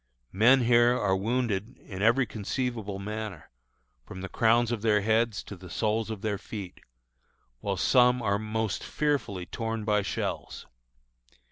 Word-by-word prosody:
Men 120 Hz, +7 st, +5 dB
here 120 Hz, +1 st, +4 dB
are 95 Hz, -2 st, +2 dB
wounded 115 Hz, +1 st, -1 dB
in 95 Hz, -2 st, -9 dB
every 120 Hz, +5 st, +4 dB
conceivable 110 Hz, -1 st, -3 dB
manner, 105 Hz, -3 st, -6 dB, 0.5 s
from 95 Hz, -, -9 dB
the 95 Hz, -, -6 dB
crowns 115 Hz, +3 st, +3 dB
of 115 Hz, -3 st, -2 dB
their 105 Hz, -2 st, +3 dB
heads 110 Hz, +1 st, +1 dB
to 100 Hz, -, -9 dB
the 90 Hz, 0 st, -12 dB
soles 110 Hz, +4 st, -1 dB
of 110 Hz, -3 st, -5 dB
their 105 Hz, -2 st, -1 dB
feet, 100 Hz, -4 st, -8 dB, 0.8 s
while -, -, -2 dB
some 125 Hz, 0 st, +4 dB
are 100 Hz, -3 st, 0 dB
most 110 Hz, -2 st, -2 dB
fearfully 140 Hz, -12 st, -1 dB
torn 115 Hz, +2 st, -4 dB
by 105 Hz, -1 st, +2 dB
shells. 100 Hz, -, -4 dB
110 Hz, 145 wpm, -28 LUFS, 100-120 Hz, 0.8 s, Men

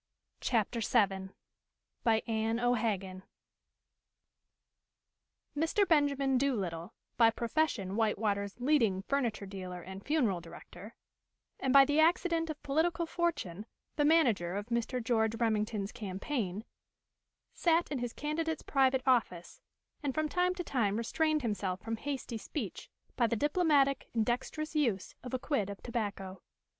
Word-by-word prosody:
CHAPTER 230 Hz, 0 st, 0 dB
VII. 195 Hz, -4 st, +1 dB, 0.7 s
BY 225 Hz, -1 st, +3 dB
ANNE 225 Hz, 0 st, 0 dB
O'HAGAN 215 Hz, -6 st, 0 dB, 2.3 s
Mr. 325 Hz, +7 st, +2 dB
Benjamin 280 Hz, -4 st, +3 dB
Doolittle, 195 Hz, -9 st, -2 dB, 0.2 s
by 230 Hz, -2 st, +7 dB
profession 230 Hz, -5 st, -1 dB
White 220 Hz, -1 st, +1 dB
water's 200 Hz, 0 st, -2 dB
leading 235 Hz, -8 st, +2 dB
furniture 240 Hz, -5 st, -1 dB
dealer 185 Hz, -2 st, -7 dB
and 190 Hz, +1 st, -9 dB
funeral 240 Hz, -, +1 dB
director, 195 Hz, +5 st, -12 dB, 0.6 s
and 265 Hz, -, 0 dB
by 275 Hz, 0 st, +8 dB
the 290 Hz, +2 st, +1 dB
accident 330 Hz, 0 st, +3 dB
of 305 Hz, -1 st, -6 dB
political 325 Hz, +4 st, +1 dB
fortune 320 Hz, -, -2 dB, 0.3 s
the 295 Hz, -, +2 dB
manager 240 Hz, -, +3 dB
of 205 Hz, +3 st, -4 dB
Mr. 235 Hz, +1 st, -1 dB
George 225 Hz, -1 st, +1 dB
Remington's 215 Hz, -3 st, 0 dB
campaign, 205 Hz, 0 st, -4 dB, 0.9 s
sat 335 Hz, -1 st, +2 dB
in 280 Hz, -, -1 dB
his 240 Hz, -1 st, -3 dB
candidate's 320 Hz, +3 st, -2 dB
private 265 Hz, -1 st, +2 dB
office, 230 Hz, -9 st, 0 dB, 0.4 s
and 280 Hz, -4 st, -2 dB
from 310 Hz, 0 st, +1 dB
time 360 Hz, +3 st, +1 dB
to 360 Hz, -, -4 dB
time 220 Hz, -, 0 dB
restrained 305 Hz, +6 st, 0 dB
himself 195 Hz, -4 st, -2 dB
from 225 Hz, +2 st, -4 dB
hasty 260 Hz, -3 st, -4 dB
speech 220 Hz, -, -6 dB, 0.3 s
by 240 Hz, -2 st, +3 dB
the 230 Hz, -, 0 dB
diplomatic 290 Hz, -1 st, +2 dB
and 225 Hz, -1 st, +2 dB
dexterous 305 Hz, +6 st, -2 dB
use 230 Hz, -11 st, 0 dB
of 255 Hz, 0 st, -4 dB
a -, -, +1 dB
quid 250 Hz, -7 st, -1 dB
of 200 Hz, -, -7 dB
tobacco. 200 Hz, -5 st, -4 dB
235 Hz, 130 wpm, -32 LUFS, 205-290 Hz, 2.3 s, by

